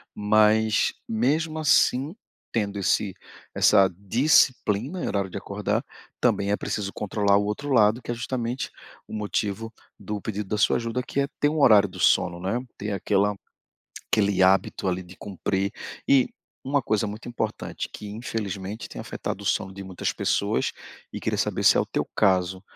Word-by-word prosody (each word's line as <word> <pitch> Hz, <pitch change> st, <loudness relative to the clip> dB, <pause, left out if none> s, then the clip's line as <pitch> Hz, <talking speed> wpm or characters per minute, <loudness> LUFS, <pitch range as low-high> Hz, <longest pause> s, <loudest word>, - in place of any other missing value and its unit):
Mas 110 Hz, +1 st, +3 dB, 0.2 s
mesmo 155 Hz, +8 st, 0 dB
assim, 145 Hz, +1 st, +3 dB, 0.4 s
tendo 105 Hz, -3 st, -1 dB
esse 100 Hz, 0 st, +1 dB, 0.4 s
essa 100 Hz, -2 st, +5 dB
disciplina 125 Hz, -, +2 dB
e -, -, -1 dB
horário 100 Hz, -1 st, -1 dB
de 95 Hz, -, -6 dB
acordar, 100 Hz, 0 st, -2 dB, 0.4 s
também 100 Hz, 0 st, +1 dB
é 105 Hz, -, +2 dB
preciso 100 Hz, -2 st, -3 dB
controlar 100 Hz, -1 st, +1 dB
o 100 Hz, -, +1 dB
outro 105 Hz, +8 st, -3 dB
lado, 110 Hz, 0 st, +4 dB
que -, -, -13 dB
é -, -, +1 dB
justamente 120 Hz, +1 st, -3 dB, 0.4 s
o -, -, -10 dB
motivo 105 Hz, +1 st, -2 dB, 0.3 s
do 105 Hz, +1 st, -4 dB
pedido 105 Hz, -1 st, -5 dB
da 105 Hz, -, 0 dB
sua 105 Hz, -, +3 dB
ajuda, 120 Hz, +1 st, -2 dB
que 140 Hz, -, -3 dB
é 140 Hz, -, +1 dB
ter 145 Hz, -, +3 dB
um 155 Hz, 0 st, -2 dB
horário 105 Hz, -6 st, +7 dB
do 95 Hz, 0 st, -11 dB
sono 85 Hz, +1 st, +3 dB
não 95 Hz, +2 st, -3 dB
é, 120 Hz, -, 0 dB, 0.2 s
ter 105 Hz, +1 st, -4 dB
aquela 100 Hz, +1 st, +1 dB, 0.8 s
aquele 100 Hz, -3 st, +3 dB
hábito 95 Hz, 0 st, +2 dB
ali 90 Hz, 0 st, -2 dB
de 90 Hz, +1 st, -14 dB
cumprir, 95 Hz, 0 st, -2 dB, 0.3 s
e 135 Hz, -2 st, +4 dB, 0.4 s
uma 140 Hz, 0 st, +1 dB
coisa 110 Hz, -2 st, 0 dB
muito 105 Hz, +4 st, -7 dB
importante 110 Hz, -3 st, -4 dB
que 105 Hz, -, -8 dB
infelizmente 105 Hz, -2 st, -5 dB
tem -, -, -8 dB
afetado -, -, -5 dB
o -, -, -9 dB
sono 95 Hz, -, 0 dB
de 100 Hz, -, -8 dB
muitas 95 Hz, -2 st, -2 dB
pessoas, -, -, 0 dB, 0.4 s
e -, -, -4 dB
queria -, -, -1 dB
saber -, -, -1 dB
se -, -, +6 dB
é -, -, +4 dB
o -, -, 0 dB
teu -, -, -2 dB
caso, 95 Hz, -2 st, +2 dB
105 Hz, 175 wpm, -25 LUFS, 100-120 Hz, 0.8 s, horário